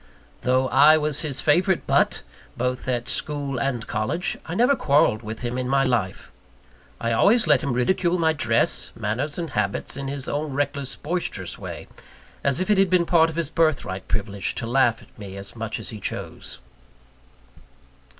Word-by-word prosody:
Though 130 +1 +2
I 150 +4 +7
was 150 -2 0
his 145 -5 -3
favourite 175 +4 +2
butt, - - +2 0.3
both 125 +1 -2
at 120 -1 -1
school 140 -3 -3
and 125 -3 -1
college, 140 - -2
I 170 - -4
never 250 +7 +4
quarrelled 140 - +3
with 110 0 -7
him 125 +1 -3
in 125 0 -2
my 135 0 +3
life. 115 -8 -1 0.7
I 115 - -1
always 215 - +4
let 150 -5 +4
him 140 - -1
ridicule 175 +8 +1
my 160 -2 +2
dress, 115 - 0
manners, 115 +7 -2
and 165 -4 -4
habits 105 -1 -1
in 135 0 -5
his 135 -1 -4
own 145 -1 -2
reckless, 140 -1 -2
boisterous 150 - -3
way, - - -7 0.6
as 140 -1 +2
if 185 +3 0
it 205 - +4
had 195 -1 +4
been 180 -1 +4
a - - -6
part 165 -1 +4
of 160 - -7
his 165 -3 -1
birthright 145 - 0
privilege 100 -2 -2
to - - -2
laugh 120 -1 +2
at - - -22
me 100 -2 -8
as 100 +3 -9
much 115 -1 -4
as - - -6
he 110 - -7
chose. - - -4
135 Hz, 180 wpm, -24 LUFS, 115-155 Hz, 0.7 s, I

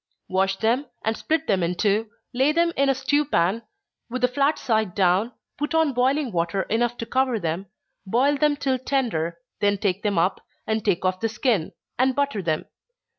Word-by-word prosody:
_ - - -68 0.2
Wash 195 +1 +1
them, 230 +7 0 0.2
and 220 +1 +1
split 320 +6 -1
them 195 - +1
in 175 +1 0
two 210 +3 +1 0.2
lay 265 +4 +3
them 335 +1 +2
in 275 0 +2
a 270 - +3
stew 280 +3 +1
pan, 215 - +1 0.5
with 250 +1 -4
the - - +6
flat 280 +4 +1
side 220 -6 0
down, 190 +5 +2 0.3
turn 300 +2 +1
on 310 -4 +2
boiling 260 +2 +1
water 175 +2 0
enough 240 +2 0
to 230 - -4
cover 255 -2 +1
them 170 +2 -3 0.4
boil 260 +8 +3
them 295 0 +2
till 265 -3 -1
tender, 225 - -1 0.2
then 205 -1 +2
take 195 -1 -1
them 205 -3 0
up, 180 +4 +1 0.2
and 220 -1 -1
take 175 - +1
off 185 0 +1
the 225 - 0
skin, 220 - 0 0.3
and 260 0 +3
butter 280 -7 0
them. 160 -3 -1
225 Hz, 195 wpm, -24 LUFS, 195-270 Hz, 0.5 s, the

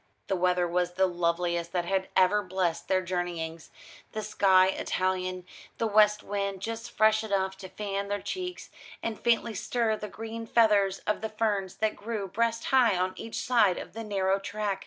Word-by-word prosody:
The 195 - +2
weather 180 -1 +2
was 175 0 0
the 190 +1 +3
loveliest 170 -1 -1
that 175 -1 0
had 190 +1 0
ever 190 +3 +4
blessed 180 -3 -2
their 185 -1 +2
journeyings 170 -3 -4 0.4
the 215 - -3
sky 190 -3 +4
Italian, 185 -1 -1 0.3
the 230 - 0
west 210 -1 +4
wind 200 -1 -2
just 225 +4 -5
fresh 220 -1 +3
enough 190 -3 -1
to 190 -1 -9
fan 200 0 -3
their 205 0 -2
cheeks, 360 - -5 0.3
and 225 -2 -3
faintly 235 -1 +2
stir 225 +2 0
the 210 0 -7
green 225 +1 -7
feathers 205 -4 +3
of 210 - 0
the 220 - -3
ferns 210 -4 -1
that 215 -1 0
grew 210 -2 -4
breast 230 +4 -1
high 240 -7 +5
on 185 +1 0
each 225 - -7
side 225 -7 +3
of - - -8
the 225 +1 -6
narrow 195 -2 +1
track. 200 -1 -3
195 Hz, 180 wpm, -28 LUFS, 185-220 Hz, 0.4 s, high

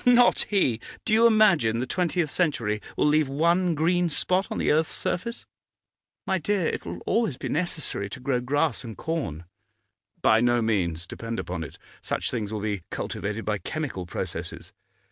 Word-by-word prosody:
'Not 245 0 +5
he! 135 - +2 0.3
Do 215 - +1
you 230 +2 +7
imagine 195 - +4
the 125 - -1
twentieth 170 +1 0
century 115 - 0 0.2
will - - +3
leave 150 0 +4
one 170 +4 +2
green 175 +3 +2
spot 185 +5 +1
on - - -3
the - - +2
earth's 155 +1 +2
surface?' 235 +6 -3 0.8
'My 190 -1 +1
dear, 195 +1 0
it - - -2
will 85 +1 -6
always 225 - +1
be - - -5
necessary 155 - -1
to 100 - -8
grow 125 -1 0
grass 145 +2 0
and 115 -3 -8
corn.' 145 - -3 0.8
'By 110 +1 +4
no 120 0 +3
means; 90 -7 0
depend 115 +5 -5
upon 90 -2 -4
it. 70 - -9 0.2
Such - - -2
things 110 -4 -3
will 110 -1 -3
be 105 -3 -2
cultivated 105 +2 -4
by 105 -1 0
chemical 140 - -4
processes. - - -6
145 Hz, 170 wpm, -26 LUFS, 110-175 Hz, 0.8 s, you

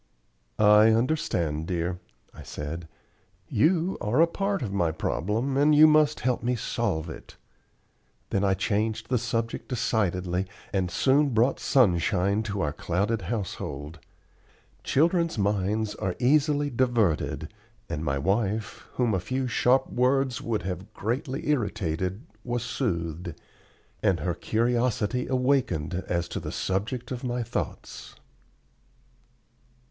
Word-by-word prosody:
"I 105 +1 +6
understand, 90 - 0
dear," 90 0 -2 0.3
I - - -11
said. 80 +3 -6 0.6
"You 175 +3 +2
are 110 +7 +1
a 165 - +8
part 195 0 -2
of 100 -4 -4
my 85 -5 +1
problem, 105 - -1
and 150 +2 +5
you 155 +1 +9
must 155 -1 +4
help 125 -1 0
me 125 +1 0
solve 80 -7 -2
it." 80 - -10 1.0
Then 100 - +1
I 95 -1 +3
changed 110 +3 -1
the 125 -2 +2
subject 115 -1 -2
decidedly, 95 -6 0 0.3
and 95 -2 0
soon 135 +6 +2
brought 120 +5 +3
sunshine 100 -3 +2
to 100 -1 -2
our 75 -4 -1
clouded 100 +8 -1
household. 85 - -5 0.8
Children's 170 +1 +2
minds 105 +1 0
are 95 -4 -3
easily 145 +2 +2
diverted; 120 -9 0 0.3
and 75 - -4
my 70 -3 0
wife, 105 +7 -1
whom 120 -4 +1
a 95 - +1
few 130 +8 -2
sharp 125 +2 +3
words 130 -1 +1
would 115 -2 -2
have 90 0 -6
greatly 130 - -3
irritated, 100 - -1 0.2
was 120 -1 -2
soothed, 85 - -3 0.7
and 90 -5 +2
her 90 +3 0
curiosity 120 +3 0
awakened 125 - +1
as 85 -1 -1
to - - -3
the - - -6
subject 115 +7 -2
of 125 0 -4
my 125 -1 -1
thoughts. - - -5
110 Hz, 125 wpm, -27 LUFS, 90-130 Hz, 1.0 s, you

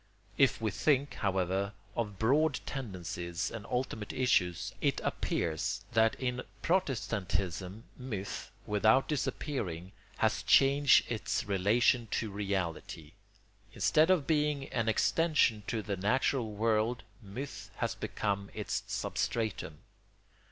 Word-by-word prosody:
If 135 +3 +3
we 110 -2 -1
think, 140 +5 +1
however, 95 0 0 0.2
of 105 -4 -2
broad 140 +7 +3
tendencies 90 - -4
and 115 -2 -7
ultimate 125 -4 -2
issues, 90 -9 +1
it - - +1
appears 80 -2 -1
that 110 0 +3
in 125 -1 -2 0.2
Protestantism 105 - -1 0.2
myth, 105 -7 -5 0.2
without 110 +5 +3
disappearing, 105 - -3 0.3
has - - +1
changed 140 -1 +5
its 115 +1 -1
relation 110 +4 +2
to 110 -3 -1
reality: 95 -6 -3 0.6
instead 155 +3 +3
of 180 -7 +3
being 150 -3 +1
an 115 -2 0
extension 155 -3 +3
to 110 -3 -2
the 100 0 -3
natural 115 +3 +1
world 110 +2 +1 0.2
myth 115 +7 -7
has - - -1
become 100 -1 -2
its - - -2
substratum. 110 -9 -2
110 Hz, 110 wpm, -32 LUFS, 100-130 Hz, 0.6 s, changed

